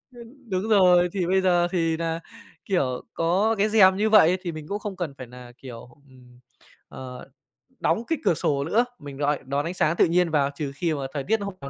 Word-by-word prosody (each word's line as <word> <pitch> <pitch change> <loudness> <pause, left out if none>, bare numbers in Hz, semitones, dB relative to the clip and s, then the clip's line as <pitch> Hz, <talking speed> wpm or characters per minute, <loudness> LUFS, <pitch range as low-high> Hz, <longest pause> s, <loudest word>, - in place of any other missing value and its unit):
Ơ, - - -12 0.3
đúng 190 +3 -2
rồi, 180 -4 +5
thì 185 -4 -1
bây 190 +1 +2
giờ 175 -2 +2
thì 165 -3 0
nà, 165 0 -3 0.4
kiểu, 135 -10 -1
có 190 +7 +1
cái 210 +2 +2
rèm 190 -3 +5
như 215 +2 +1
vậy 185 -5 +5
thì 175 -2 -4
mình 155 -1 -9
cũng 205 - -3
không 205 -2 -6
cần 170 -6 -4
phải 130 - -9
nà, 125 0 -12
kiểu, 125 -2 -11 0.2
ừm, 125 -1 -19 0.5
ờ, 130 0 -10 0.5
đóng 230 - 0
cái 325 -3 -1
cửa - - +3
sổ 140 -3 -1
nữa, 220 +11 +1
mình 140 -2 -10
rọi 145 0 0
đón 140 +2 -2
ánh 170 - -3
sáng 165 -2 +1
tự - - +5
nhiên 175 +1 +1
vào 140 -2 +2
trừ 145 -2 -4
khi 165 +3 -1
mà 145 - -4
thời 140 -2 -3
tiết 220 +8 0
hôm 200 -1 -5
nào 140 - -7
170 Hz, 225 wpm, -24 LUFS, 140-190 Hz, 0.5 s, rồi